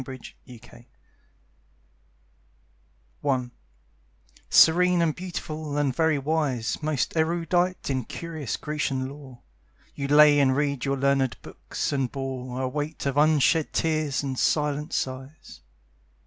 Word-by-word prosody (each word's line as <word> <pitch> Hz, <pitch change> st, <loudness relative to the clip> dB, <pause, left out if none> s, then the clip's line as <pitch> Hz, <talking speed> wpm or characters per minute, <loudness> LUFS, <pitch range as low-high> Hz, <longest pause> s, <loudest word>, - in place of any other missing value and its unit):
In 130 Hz, -1 st, -7 dB, 0.5 s
Memory 120 Hz, -1 st, -17 dB, 2.4 s
I 125 Hz, -3 st, 0 dB, 1.0 s
Serene 180 Hz, +2 st, +5 dB
and 160 Hz, -2 st, +1 dB
beautiful 155 Hz, -4 st, -5 dB
and 140 Hz, -3 st, 0 dB
very 160 Hz, -2 st, +2 dB
wise, 140 Hz, -5 st, -1 dB
Most 150 Hz, -1 st, -1 dB
erudite 175 Hz, +3 st, 0 dB
in 130 Hz, -4 st, -1 dB
curious 160 Hz, -6 st, -5 dB
Grecian 140 Hz, -3 st, -2 dB
lore, 135 Hz, -3 st, -12 dB, 0.5 s
You 140 Hz, -, -4 dB
lay 150 Hz, 0 st, +6 dB
and 130 Hz, -2 st, +3 dB
read 140 Hz, -3 st, -1 dB
your 140 Hz, 0 st, 0 dB
learned 135 Hz, -1 st, +1 dB
books, -, -, -5 dB
and 135 Hz, -3 st, -1 dB
bore 130 Hz, -2 st, -5 dB
A -, -, 0 dB
weight 150 Hz, +4 st, -4 dB
of 140 Hz, -1 st, -1 dB
unshed 155 Hz, +1 st, +3 dB
tears 155 Hz, -3 st, 0 dB
and 135 Hz, -2 st, -3 dB
silent 150 Hz, +1 st, 0 dB
sighs. 130 Hz, +3 st, -5 dB
145 Hz, 120 wpm, -25 LUFS, 130-155 Hz, 2.4 s, lay